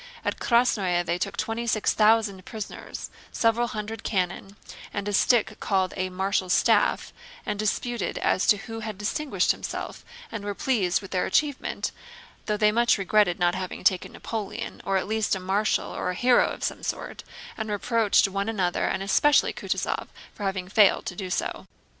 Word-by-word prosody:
At - - -1
Krásnoe 200 -8 +2
they 170 +1 -1
took - - -3
twenty 230 +1 -2
six 215 -2 +2
thousand 215 -3 +3
prisoners, 220 -1 -7 0.2
several 230 +1 +2
hundred 220 0 -5
cannon, 190 0 -2 0.4
and 205 0 -4
a 205 - -2
stick 215 0 +3
called 190 -2 0
a 185 -1 -2
"marshal's 190 0 0
staff," - - +2 0.3
and 205 -1 -3
disputed 230 +1 -1
as 185 - +1
to 210 - +6
who 225 +2 -7
had 215 -2 -5
distinguished 270 +8 0
himself - - -5 0.3
and 205 - -5
were 205 0 -3
pleased 210 -10 +1
with 195 - -10
their 180 -1 0
achievement—though 305 - -3
they 210 0 +4
much 235 +2 +3
regretted 195 -2 +2
not 175 0 +2
having 185 0 -5
taken 185 -2 +2
Napoleon, 220 -3 -5
or 195 0 +1
at 190 - -2
least 220 -1 +1
a - - -4
marshal 195 +3 0
or - - -2
a 180 - -2
hero 245 +4 +4
of - - -6
some - - -2
sort, - - -5 0.3
and 220 -1 -4
reproached 210 0 +2
one 200 +2 -2
another 185 -5 0
and 195 - -1
especially 290 +9 +4
Kutúzov - - -2 0.3
for - - -14
having 190 -2 -2
failed 200 0 +4
to 180 - -4
do 185 0 -5
so. - - -3
205 Hz, 170 wpm, -26 LUFS, 190-225 Hz, 0.4 s, to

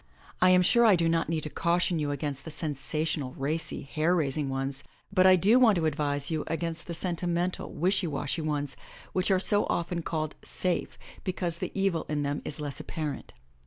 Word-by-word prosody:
I 185 - +7
am 180 0 +6
sure 235 +6 +5
I 215 -4 +7
do 165 -1 +2
not 165 -1 +1
need 160 -2 -1
to 150 - -2
caution 175 0 +1
you 150 -1 -1
against 145 -1 -3
the - - -7
sensational, 150 -2 -2
racy, 155 +4 -3
hair 155 +5 +1
rais 145 -6 0
ing 150 -3 -1
ones, 135 0 -3 0.3
but 185 -1 +6
I 185 0 +7
dp 210 +8 +5
want 225 -5 +6
to 170 -2 0
advise 145 -1 0
you 155 -2 0
against 165 +1 -3
the 170 - -3
sentimental, 175 0 -2
wishy 185 +2 +1
washy 145 +2 -2
ones, 145 -2 -2 0.4
which 185 +1 +2
are 190 -1 +4
so 205 +2 +2
often 170 0 -1
called 155 -2 -2
"safe'* 180 -2 -2 0.3
because 180 -3 -2
the - - -3
evil 195 -4 +1
in 150 -1 0
them 145 +1 -2
is 150 - -5
less 145 -2 -5
apparent. 150 -3 -5
165 Hz, 200 wpm, -28 LUFS, 145-180 Hz, 0.4 s, I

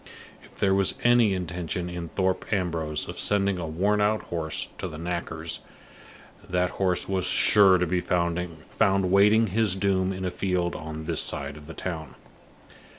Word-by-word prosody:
If - - -19
there 95 -1 +2
was 95 -1 +2
any 120 -4 +4
intention 90 0 -4
in 90 -1 -6
Thorpe 95 0 -1
Ambrose 85 -6 -1
of - - -7
sending 100 -2 +1
a 85 - -4
worn 100 +7 +1
out 105 +1 +1
horse 80 -2 -3
to - - -3
the 75 - -8
knacker's, 85 -1 -3 0.8
that 90 0 0
horse 90 -2 0
was 95 -2 0
sure 100 -3 +6
to 90 - +1
be 90 +1 0
found 85 -1 0 0.7
waiting 105 +3 +5
his 105 -1 +1
doom 95 -1 +1
in 95 0 -4
a 90 - -1
field 90 -1 -1
on 80 0 -6
this 80 -1 -1
side 70 +1 -4
of 75 -1 -13
the 80 - -9
town. 80 -4 -5
90 Hz, 165 wpm, -26 LUFS, 85-95 Hz, 0.8 s, sure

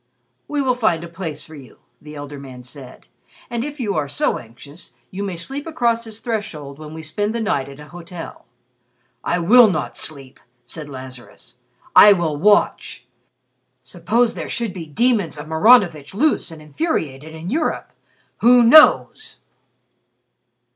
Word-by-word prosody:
'" 120 - -48
"We 290 -1 -1
will 255 -1 +2
find 215 -9 0
a - - -7
place 165 -3 -7
for 160 - -14
you," 135 -6 -13 0.2
the 150 0 -11
elder 145 0 -8
man 130 -2 -11
said, 130 0 -12 0.5
"and 235 -1 -2
if 295 +1 -7
you 210 -5 -1
are 145 - -1
so 135 - -1
anxious, 125 +4 -14 0.2
you 190 - -6
may 195 -3 -3
sleep 270 - -5
across 235 -6 0
his 220 -1 -8
threshold 165 - -5
when 155 0 -9
we 160 - -8
spend 205 +8 -2
the - - -1
night 200 -12 -1
at 140 +1 -12
a 150 - -12
hotel." 175 -1 -10 0.8
"I 175 - 0
will 220 +7 +6
not 155 -5 -3
sleep!" 140 -4 -7 0.3
said 150 +4 -8
Lazarus. 130 -2 -11 0.4
"I 205 - +9
will 170 -5 -1
watch. 195 - +1 0.8
Suppose 210 - 0
there - - -6
should 230 -5 -3
be 170 -4 -8
demons 200 - 0
of 150 - -7
Maranovitch 160 - +3
loose 295 +1 +1
and 160 -2 -11
infuriated 155 - -3
in 165 +3 -7
Europe? 310 +4 -2 0.5
Who 245 +1 +6
knows!" 305 +7 +5
170 Hz, 160 wpm, -20 LUFS, 145-230 Hz, 0.8 s, I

